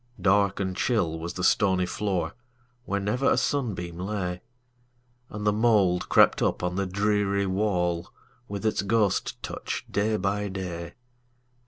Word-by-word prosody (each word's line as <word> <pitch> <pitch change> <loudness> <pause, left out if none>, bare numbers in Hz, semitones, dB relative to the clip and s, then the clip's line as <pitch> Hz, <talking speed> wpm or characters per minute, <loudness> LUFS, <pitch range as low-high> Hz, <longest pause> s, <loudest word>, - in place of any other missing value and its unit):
Dark 100 0 +3
and 95 -2 -2
chill 90 -9 0
was 85 +2 -5
the 90 - -4
stony 95 -1 +3
floor, 95 0 -2 0.5
Where 100 - -1
never 105 +7 +1
a - - +3
sunbeam 90 -11 -1
lay, 90 -2 -3 0.9
And 105 0 -6
the 105 - +3
mould 105 -5 +2
crept - - +5
up - - 0
on 90 0 -1
the 100 0 -1
dreary 100 +1 +1
wall, 90 -3 0 0.4
With 100 +1 -5
its 110 - +1
ghost 105 0 0
touch, - - -4
day 105 +2 +1
by 100 +2 -1
day. 90 -3 -5
100 Hz, 145 wpm, -26 LUFS, 90-105 Hz, 0.9 s, crept